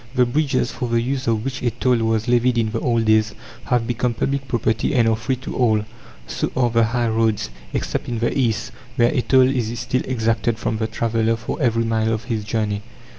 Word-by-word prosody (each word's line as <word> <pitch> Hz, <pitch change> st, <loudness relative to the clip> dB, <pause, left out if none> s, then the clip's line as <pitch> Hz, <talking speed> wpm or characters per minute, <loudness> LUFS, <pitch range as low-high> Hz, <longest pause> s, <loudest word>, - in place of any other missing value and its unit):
The 125 Hz, -1 st, +4 dB
bridges, 135 Hz, +1 st, 0 dB
for 125 Hz, -, -4 dB
the 115 Hz, 0 st, +2 dB
use 130 Hz, +2 st, -2 dB
of 110 Hz, 0 st, 0 dB
which 130 Hz, -1 st, -3 dB
a 125 Hz, -, +1 dB
toll 125 Hz, +2 st, +1 dB
was 110 Hz, 0 st, 0 dB
levied 120 Hz, 0 st, +3 dB
in 110 Hz, -2 st, +1 dB
the 115 Hz, -, -2 dB
old 115 Hz, -2 st, +1 dB
days, 110 Hz, -1 st, +3 dB, 0.3 s
have 120 Hz, -2 st, +1 dB
become 120 Hz, 0 st, -1 dB
public 135 Hz, +3 st, -1 dB
property 115 Hz, +2 st, 0 dB
and 120 Hz, -3 st, +4 dB
are 110 Hz, -, +3 dB
free 125 Hz, +4 st, -2 dB
to 130 Hz, -, -7 dB
all; 110 Hz, -4 st, +2 dB, 0.4 s
so -, -, -3 dB
are 120 Hz, -2 st, +2 dB
the 115 Hz, 0 st, +4 dB
high 120 Hz, +1 st, 0 dB
roads, 110 Hz, -, 0 dB, 0.2 s
except -, -, -3 dB
in 120 Hz, -, -2 dB
the 115 Hz, +1 st, 0 dB
East, 120 Hz, -6 st, 0 dB, 0.2 s
where 120 Hz, -2 st, +3 dB
a -, -, +2 dB
toll 130 Hz, 0 st, +4 dB
is 120 Hz, -3 st, -1 dB
still 130 Hz, +2 st, -1 dB
exacted 115 Hz, -2 st, 0 dB
from 110 Hz, -, -2 dB
the 110 Hz, -, 0 dB
traveller 115 Hz, 0 st, 0 dB
for 115 Hz, +7 st, -5 dB
every 115 Hz, -3 st, +2 dB
mile 110 Hz, 0 st, 0 dB
of 110 Hz, 0 st, -2 dB
his 115 Hz, -4 st, -3 dB
journey. 105 Hz, -1 st, -1 dB
115 Hz, 220 wpm, -21 LUFS, 110-125 Hz, 0.4 s, The